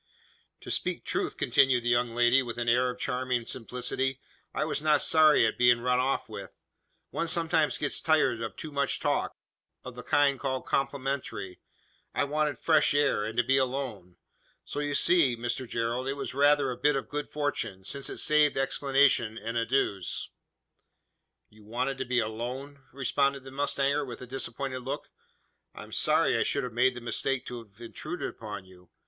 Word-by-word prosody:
"To -, -, -7 dB
speak -, -, -2 dB
truth," -, -, -2 dB
continued 130 Hz, -3 st, +3 dB
the 120 Hz, -, 0 dB
young 120 Hz, -1 st, +1 dB
lady, 120 Hz, +2 st, +5 dB
with 120 Hz, -3 st, -6 dB
an 120 Hz, 0 st, -2 dB
air 125 Hz, +2 st, +3 dB
of 125 Hz, -, -5 dB
charming 125 Hz, -1 st, -1 dB
simplicity, 125 Hz, +2 st, -3 dB, 0.3 s
"I -, -, -1 dB
was 155 Hz, -1 st, -2 dB
not 150 Hz, -1 st, +3 dB
sorry 155 Hz, -6 st, +5 dB
at 110 Hz, -, -1 dB
being 120 Hz, -1 st, +5 dB
run 125 Hz, +1 st, +2 dB
off 135 Hz, +2 st, 0 dB
with. -, -, -9 dB, 0.6 s
One 170 Hz, -, -2 dB
sometimes 160 Hz, -2 st, +2 dB
gets 145 Hz, -, +1 dB
tired 155 Hz, -8 st, +2 dB
of 110 Hz, -3 st, -5 dB
too 155 Hz, -, -7 dB
much 140 Hz, -1 st, 0 dB
talk -, -, 0 dB, 0.5 s
of -, -, -8 dB
the -, -, -8 dB
kind 140 Hz, -2 st, +2 dB
called 130 Hz, -2 st, -2 dB
complimentary. 135 Hz, -8 st, -2 dB, 0.6 s
I -, -, +2 dB
wanted 150 Hz, -1 st, 0 dB
fresh 155 Hz, 0 st, +3 dB
air, 145 Hz, -7 st, +2 dB
and 110 Hz, +2 st, -5 dB
to 120 Hz, -, +4 dB
be 135 Hz, +3 st, +3 dB
alone. 125 Hz, -9 st, -2 dB, 0.5 s
So -, -, -5 dB
you 145 Hz, -1 st, -1 dB
see, 145 Hz, -10 st, +4 dB
Mr 120 Hz, +1 st, -3 dB
Gerald, 120 Hz, +3 st, -2 dB
it 135 Hz, -, 0 dB
was 140 Hz, -2 st, -5 dB
rather 145 Hz, 0 st, +3 dB
a 125 Hz, -, -5 dB
bit 145 Hz, +3 st, +2 dB
of 135 Hz, -5 st, -3 dB
good 145 Hz, 0 st, -4 dB
fortune: 145 Hz, -10 st, -3 dB
since 135 Hz, +7 st, -4 dB
it -, -, -6 dB
saved 150 Hz, -2 st, +3 dB
explanations 135 Hz, -4 st, +2 dB
and 115 Hz, +3 st, -5 dB
adieus." 115 Hz, -5 st, -1 dB, 1.2 s
"You 105 Hz, 0 st, -18 dB
wanted 125 Hz, +5 st, -3 dB
to 130 Hz, -, -2 dB
be 125 Hz, 0 st, -1 dB
alone?" 125 Hz, +6 st, -4 dB
responded 140 Hz, +1 st, 0 dB
the 135 Hz, -, -10 dB
mustanger, 140 Hz, +1 st, 0 dB
with 125 Hz, -4 st, -7 dB
a 125 Hz, -, -8 dB
disappointed 130 Hz, +1 st, -3 dB
look. 135 Hz, +3 st, -5 dB, 0.6 s
"I -, -, -8 dB
am -, -, -14 dB
sorry -, -, +2 dB
I -, -, +3 dB
should 140 Hz, -, -1 dB
have 125 Hz, -2 st, -5 dB
made 125 Hz, +2 st, +3 dB
the 125 Hz, -, -7 dB
mistake 130 Hz, +2 st, -1 dB
to 120 Hz, -, -6 dB
have 105 Hz, -1 st, -26 dB
intruded 150 Hz, +8 st, -5 dB
upon 105 Hz, -4 st, -8 dB
you. 90 Hz, -1 st, -18 dB
130 Hz, 180 wpm, -28 LUFS, 120-140 Hz, 1.2 s, lady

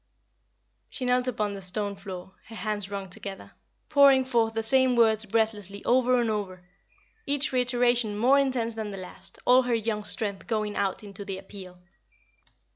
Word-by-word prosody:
She 255 Hz, -, -4 dB
knelt 250 Hz, 0 st, +2 dB
upon 210 Hz, -4 st, -1 dB
the 200 Hz, -, -7 dB
stone 200 Hz, +2 st, -1 dB
floor, 190 Hz, -1 st, -9 dB
her 225 Hz, -, -10 dB
hands 205 Hz, -1 st, -3 dB
wrung 200 Hz, -1 st, -5 dB
together, 195 Hz, +2 st, -8 dB, 0.4 s
pouring 275 Hz, -3 st, +5 dB
forth 230 Hz, -3 st, +1 dB
the 225 Hz, -, -1 dB
same 260 Hz, +2 st, +3 dB
words 220 Hz, -2 st, +3 dB
breathlessly 205 Hz, -2 st, -1 dB
over 250 Hz, 0 st, +3 dB
and 235 Hz, -, +1 dB
over, 185 Hz, -4 st, -5 dB, 0.6 s
each 285 Hz, +1 st, +2 dB
reiteration 245 Hz, -4 st, +2 dB
more 260 Hz, +6 st, +4 dB
intense 255 Hz, -4 st, 0 dB
than 220 Hz, -1 st, -5 dB
the 195 Hz, -, -7 dB
last, 185 Hz, 0 st, -8 dB
all 250 Hz, +1 st, +6 dB
her 245 Hz, -2 st, 0 dB
young 220 Hz, -1 st, -2 dB
strength 205 Hz, -2 st, -2 dB
going 215 Hz, -2 st, -2 dB
out 200 Hz, +2 st, -1 dB
into 200 Hz, -1 st, -8 dB
the 195 Hz, -1 st, -5 dB
appeal. 190 Hz, -2 st, -11 dB
220 Hz, 165 wpm, -27 LUFS, 200-245 Hz, 0.6 s, all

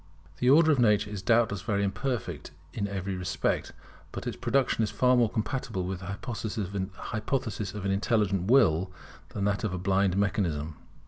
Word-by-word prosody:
The 125 Hz, -, +2 dB
Order 155 Hz, +3 st, +6 dB
of 140 Hz, -, +2 dB
Nature 105 Hz, -3 st, +3 dB
is 105 Hz, -3 st, -5 dB
doubtless 110 Hz, -1 st, +2 dB
very 100 Hz, -2 st, 0 dB
imperfect 100 Hz, -, -3 dB, 0.2 s
in 100 Hz, -3 st, -2 dB
every 95 Hz, -1 st, -3 dB
respect; 90 Hz, -1 st, -1 dB, 0.4 s
but -, -, -6 dB
its -, -, -3 dB
production 130 Hz, -2 st, +1 dB
is 105 Hz, -, 0 dB
far 125 Hz, 0 st, +3 dB
more 120 Hz, -3 st, +3 dB
compatible 110 Hz, -3 st, -2 dB
with 90 Hz, 0 st, -4 dB
the 90 Hz, -, -9 dB
hypothesis 105 Hz, +1 st, -3 dB
of 100 Hz, -2 st, -5 dB
an 100 Hz, -, +1 dB
intelligent 100 Hz, -2 st, +1 dB
Will 95 Hz, -, +4 dB, 0.4 s
than 100 Hz, -, -3 dB
with 100 Hz, -, +3 dB
that -, -, -9 dB
of 105 Hz, -3 st, -1 dB
a -, -, -3 dB
blind 95 Hz, 0 st, +1 dB
mechanism. 85 Hz, -7 st, -1 dB
100 Hz, 175 wpm, -28 LUFS, 95-115 Hz, 0.4 s, Order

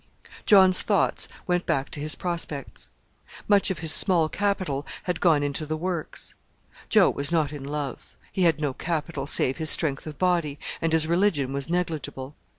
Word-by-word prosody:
John's 190 Hz, -3 st, +6 dB
thoughts 205 Hz, -2 st, 0 dB, 0.2 s
went 180 Hz, -1 st, -1 dB
back 135 Hz, 0 st, -1 dB
to -, -, -4 dB
his 150 Hz, +1 st, +1 dB
prospects. 165 Hz, -, -5 dB, 0.6 s
Much 205 Hz, -1 st, +3 dB
of 190 Hz, -, -3 dB
his 160 Hz, -, +8 dB
small 170 Hz, -5 st, +4 dB
capital 185 Hz, -8 st, -2 dB, 0.2 s
had 180 Hz, -2 st, -3 dB
gone 155 Hz, -4 st, +3 dB
into 145 Hz, +2 st, -3 dB
the 155 Hz, +1 st, -4 dB
works. 175 Hz, -1 st, -5 dB, 0.6 s
Joe -, -, +4 dB
was 140 Hz, +3 st, -2 dB
not 155 Hz, -3 st, 0 dB
in 145 Hz, -2 st, -8 dB
love 145 Hz, 0 st, -5 dB, 0.3 s
he 190 Hz, -, -3 dB
had 165 Hz, -4 st, +3 dB
no 145 Hz, -3 st, -2 dB
capital 155 Hz, -2 st, -4 dB
save 135 Hz, -3 st, +2 dB
his 160 Hz, -1 st, +3 dB
strength 150 Hz, -2 st, +4 dB
of 150 Hz, -2 st, -8 dB
body, 170 Hz, -6 st, 0 dB, 0.2 s
and 165 Hz, -, 0 dB
his 160 Hz, -1 st, +2 dB
religion 170 Hz, -6 st, 0 dB
was 140 Hz, +2 st, -4 dB
negligible. 155 Hz, -5 st, -4 dB
160 Hz, 170 wpm, -25 LUFS, 145-180 Hz, 0.6 s, his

